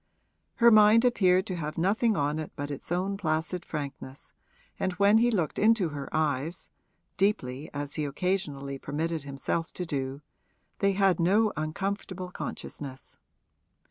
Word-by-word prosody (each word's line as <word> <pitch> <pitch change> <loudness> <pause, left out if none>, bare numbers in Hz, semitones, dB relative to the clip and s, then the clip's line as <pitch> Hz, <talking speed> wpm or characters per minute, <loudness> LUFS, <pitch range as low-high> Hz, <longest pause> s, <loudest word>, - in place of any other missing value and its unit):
Her 235 -2 +6
mind 215 +2 +7
appeared 185 -6 +3
to 185 - -3
have 155 -2 -4
nothing 210 +6 +2
on 145 +2 0
it 155 - -5
but 145 +1 -4
its 145 +3 -8
own 190 +3 0
placid 165 0 -1
frankness, 140 -3 -7 0.5
and 185 - 0
when 200 +3 +5
he 240 +1 +4
looked 180 -9 -1
into 215 -5 +4
her 145 -2 -6
eyes 155 +2 -1 0.5
(deeply, 150 -9 0
as 145 0 -4
he 155 - -1
occasionally 140 -3 -2
permitted 155 +2 -3
himself 140 +4 -3
to 180 - -4
do), 135 -2 -3 0.6
they 200 0 +3
had 195 -3 +3
no 205 +6 +3
uncomfortable 185 +3 -3
consciousness. 135 -6 -7
170 Hz, 140 wpm, -28 LUFS, 145-195 Hz, 0.6 s, mind